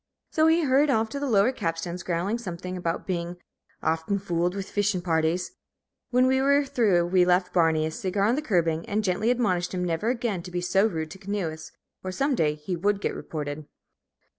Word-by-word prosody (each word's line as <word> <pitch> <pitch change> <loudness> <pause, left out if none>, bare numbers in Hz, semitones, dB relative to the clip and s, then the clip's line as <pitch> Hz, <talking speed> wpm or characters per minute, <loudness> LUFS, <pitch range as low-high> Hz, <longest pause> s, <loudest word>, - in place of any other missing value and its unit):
So 315 0 +3
he 325 +1 +4
hurried 280 +1 +3
off 225 -4 +2
to 280 - -4
the 285 -1 -2
lower 210 +2 +4
capstans, 170 -4 -3
growling 185 +6 -1
something 180 -3 -6
about 170 -2 -3
being 175 -1 -3 0.5
"oft'n 165 +5 0
fooled 175 -1 -1
with 195 -1 -4
fish'n' 200 -3 0
parties." 165 +1 0 0.6
When 250 +1 +3
we 265 +1 +3
were 280 +1 +3
through 205 -10 +2
we 180 +1 +3
left 180 +1 +2
Barney 160 -3 +3
a 160 - -2
cigar 190 +4 -2
on 225 - +3
the 290 - 0
curbing, 170 - +1
and 215 +1 0
gently 200 +4 +1
admonished 190 -8 0
him 180 0 -1
never 170 +6 -1
again 235 -7 -1
to 180 - -9
be 180 0 -2
so 190 +4 +2
rude 160 -6 -4
to 190 - -10
canoeists, 185 -6 -4 0.3
or 185 - -3
some 275 +9 0
day 150 -10 +1
he 150 +5 -4
would 200 +4 0
get - - -2
reported. 150 -1 -5
185 Hz, 200 wpm, -26 LUFS, 170-220 Hz, 0.6 s, he